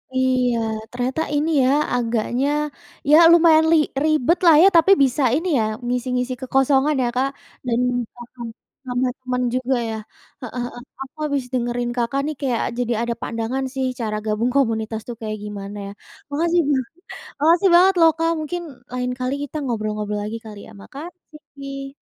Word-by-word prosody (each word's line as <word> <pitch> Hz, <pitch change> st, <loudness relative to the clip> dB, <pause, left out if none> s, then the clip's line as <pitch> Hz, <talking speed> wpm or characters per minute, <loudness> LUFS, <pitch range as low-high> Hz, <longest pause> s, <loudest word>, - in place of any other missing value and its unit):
Iya, 255 Hz, -2 st, +2 dB, 0.3 s
ternyata 250 Hz, +5 st, -2 dB
ini 300 Hz, +3 st, +1 dB
ya, 255 Hz, -, +3 dB, 0.3 s
agaknya 240 Hz, +2 st, 0 dB, 0.6 s
ya 305 Hz, -, +9 dB
lumayan 320 Hz, -2 st, +6 dB
li 330 Hz, -, +6 dB, 0.3 s
ribet 310 Hz, +2 st, +2 dB
lah 330 Hz, -, +8 dB
ya, -, -, +8 dB
tapi 335 Hz, +4 st, +5 dB
bisa 265 Hz, +2 st, +1 dB
ini 330 Hz, +5 st, -1 dB
ya -, -, +2 dB, 0.2 s
ngisi-ngisi 250 Hz, +1 st, -1 dB
kekosongan 270 Hz, +3 st, +2 dB
ya, -, -, +1 dB
Kak, 265 Hz, +2 st, +1 dB, 0.4 s
dan 240 Hz, -1 st, 0 dB
juga 245 Hz, -1 st, -4 dB, 0.2 s
nambah 235 Hz, -2 st, -7 dB, 0.4 s
nambah 250 Hz, +1 st, 0 dB
temen 250 Hz, -1 st, -2 dB
juga 255 Hz, +1 st, 0 dB
ya. 220 Hz, -, -3 dB, 0.5 s
Heeh 245 Hz, 0 st, -5 dB
heeh. 245 Hz, 0 st, -8 dB, 0.2 s
Aku 270 Hz, -, -15 dB
habis 285 Hz, -3 st, -1 dB
dengerin 240 Hz, 0 st, -1 dB
Kakak 245 Hz, +4 st, 0 dB
nih 305 Hz, 0 st, -3 dB
kayak 255 Hz, -4 st, 0 dB
jadi 245 Hz, -1 st, 0 dB
ada 235 Hz, 0 st, -1 dB
pandangan 230 Hz, +4 st, -3 dB
sih 265 Hz, -1 st, -1 dB
cara 215 Hz, -2 st, -2 dB
gabung 220 Hz, +3 st, 0 dB
komunitas 220 Hz, -3 st, 0 dB
tuh 240 Hz, -, -5 dB
kayak 215 Hz, -1 st, -4 dB
gimana 205 Hz, 0 st, -7 dB
ya. -, -, -7 dB, 0.4 s
Makasih 335 Hz, +4 st, +2 dB
banget 265 Hz, 0 st, -1 dB, 0.5 s
makasih 335 Hz, +6 st, +4 dB
banget 375 Hz, +2 st, +6 dB
loh, 325 Hz, -1 st, +7 dB
Kak. 330 Hz, 0 st, +1 dB
Mungkin 345 Hz, +3 st, -4 dB, 0.3 s
lain 250 Hz, 0 st, -2 dB
kali 255 Hz, +1 st, -1 dB
kita 290 Hz, -, -9 dB
ngobrol-ngobrol 215 Hz, -3 st, -3 dB
lagi 220 Hz, +2 st, -4 dB
kali 210 Hz, -2 st, -9 dB
ya. -, -, -14 dB
Makasih. 285 Hz, -3 st, -10 dB
255 Hz, 165 wpm, -21 LUFS, 235-290 Hz, 0.6 s, ya